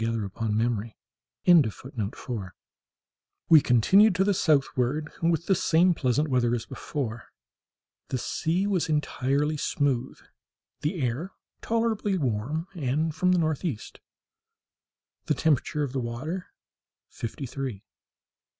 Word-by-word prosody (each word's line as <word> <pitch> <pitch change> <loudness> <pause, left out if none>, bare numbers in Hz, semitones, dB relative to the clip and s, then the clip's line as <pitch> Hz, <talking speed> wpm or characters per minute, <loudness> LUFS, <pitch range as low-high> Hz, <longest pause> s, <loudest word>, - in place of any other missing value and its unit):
CHAPTER 115 -2 -1
18 115 -1 -2
January 115 -1 -1 0.5
18.—This 160 - +4
morning 105 -4 -1
{*4} 105 -7 -5 1.0
we 160 -3 +8
continued 185 - +5
to 185 - +3
the 200 +1 +2
southward, 150 -3 +1
with 165 0 +1
the 195 - +3
same 180 -1 +3
pleasant 140 +1 +1
weather 125 -3 +2
as 115 - -4
before. 120 -6 -5 0.8
The 130 - -2
sea 170 +8 -1
was 190 -5 0
entirely 150 0 0
smooth, 135 -3 -1 0.6
the 155 0 -2
air 135 +10 -2 0.3
tolerably 225 -3 0
warm 135 +3 -1
and 155 0 -1
from 180 +4 +2
the 180 - +4
northeast, 155 - -2 1.3
the 150 - +2
temperature 150 0 +1
of 135 -3 -4
the 135 - -1
water 130 +10 -4 0.6
fifty 115 +5 -6
three. 130 -5 -5
145 Hz, 125 wpm, -27 LUFS, 120-170 Hz, 1.3 s, we